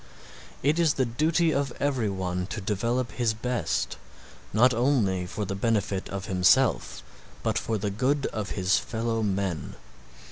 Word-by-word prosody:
It 150 Hz, +5 st, +2 dB
is 165 Hz, -4 st, +3 dB
the 130 Hz, -, +2 dB
duty 155 Hz, +7 st, +2 dB
of 140 Hz, -2 st, 0 dB
every 130 Hz, -7 st, 0 dB
one 90 Hz, -2 st, -2 dB
to 110 Hz, +1 st, -5 dB
develop 115 Hz, +4 st, -1 dB
his 110 Hz, 0 st, 0 dB
best, 110 Hz, -, -1 dB, 0.5 s
not 120 Hz, +4 st, +5 dB
only 110 Hz, -8 st, +1 dB
for 105 Hz, +3 st, -4 dB
the 100 Hz, -, -3 dB
benefit 100 Hz, -2 st, -1 dB
of 100 Hz, 0 st, -4 dB
himself 90 Hz, -, +2 dB, 0.4 s
but -, -, +1 dB
for 110 Hz, -, -2 dB
the 100 Hz, 0 st, -2 dB
good 135 Hz, +6 st, +1 dB
of 105 Hz, -2 st, -3 dB
his 95 Hz, 0 st, +2 dB
fellow 115 Hz, -1 st, -2 dB
men. 95 Hz, -7 st, -2 dB
110 Hz, 150 wpm, -27 LUFS, 95-125 Hz, 0.5 s, not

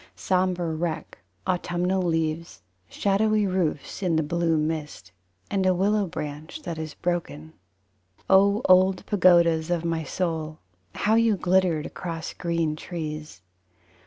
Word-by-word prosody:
Sombre 180 Hz, -3 st, 0 dB
wreck 160 Hz, -4 st, -4 dB, 0.3 s
autumnal 180 Hz, +1 st, 0 dB
leaves; 165 Hz, -, -2 dB, 0.3 s
Shadowy 210 Hz, +1 st, +1 dB
roofs 180 Hz, -4 st, -2 dB
In 180 Hz, -4 st, +1 dB
the 160 Hz, -, +2 dB
blue 165 Hz, +1 st, +1 dB
mist, 155 Hz, -, -3 dB, 0.4 s
And 195 Hz, -1 st, +1 dB
a 185 Hz, -1 st, +3 dB
willow 200 Hz, +2 st, +1 dB
branch 155 Hz, -, -6 dB
that 165 Hz, -, -5 dB
is 155 Hz, -1 st, -6 dB
broken. 160 Hz, -3 st, -3 dB, 0.7 s
O 200 Hz, +4 st, +4 dB
old 185 Hz, 0 st, +4 dB
pagodas 170 Hz, -4 st, +4 dB
of 170 Hz, -1 st, -1 dB
my 165 Hz, -1 st, -1 dB
soul, 160 Hz, -1 st, -3 dB, 0.4 s
how 215 Hz, -, +1 dB
you 225 Hz, -2 st, +3 dB
glittered 180 Hz, -4 st, +2 dB
across 165 Hz, -3 st, -6 dB
green 170 Hz, -3 st, -1 dB
trees! 155 Hz, -, -6 dB
170 Hz, 125 wpm, -25 LUFS, 160-185 Hz, 0.7 s, O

